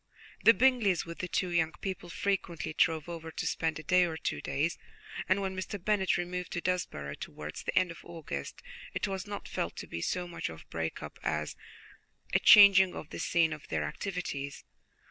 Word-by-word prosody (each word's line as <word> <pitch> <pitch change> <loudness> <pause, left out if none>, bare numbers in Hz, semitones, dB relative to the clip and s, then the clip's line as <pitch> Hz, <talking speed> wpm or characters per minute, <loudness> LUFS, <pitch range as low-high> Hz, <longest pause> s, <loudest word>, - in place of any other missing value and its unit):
The 230 - +8
Bingleys, 240 -8 +3
with 170 0 -8
the 180 - -2
two 180 +1 0
young 165 -2 +1
people, 190 -2 -5
frequently 175 -4 -2
drove 160 0 +2
over 165 -1 -6
to - - -3
spend 160 -1 0
a 155 - -8
day 180 +4 +4
or 160 -2 -3
two 75 - -3
days, 155 +5 -1 0.5
and 190 +2 +3
when 190 -1 -2
Mr. 185 +2 -4
Bennet 195 0 +1
removed 180 0 -3
to - - -1
Desborough 170 - -2
towards 75 +1 -7
the - - -2
end 185 -2 +3
of 165 - -11
August, 155 - -6 0.3
it - - 0
was 195 0 -4
not 205 0 -6
felt - - -3
to - - -6
be 85 - -5
so 180 - -1
much 175 - -4
of 80 -1 -9
a - - -35
break 80 0 -3
up - - -9
as 75 0 -2 0.8
a - - +5
changing 195 -3 +8
of 155 - -8
the - - -6
scene 165 -2 +2
of 150 - -10
their - - -1
activities. 145 -8 -4
175 Hz, 200 wpm, -31 LUFS, 155-190 Hz, 0.8 s, The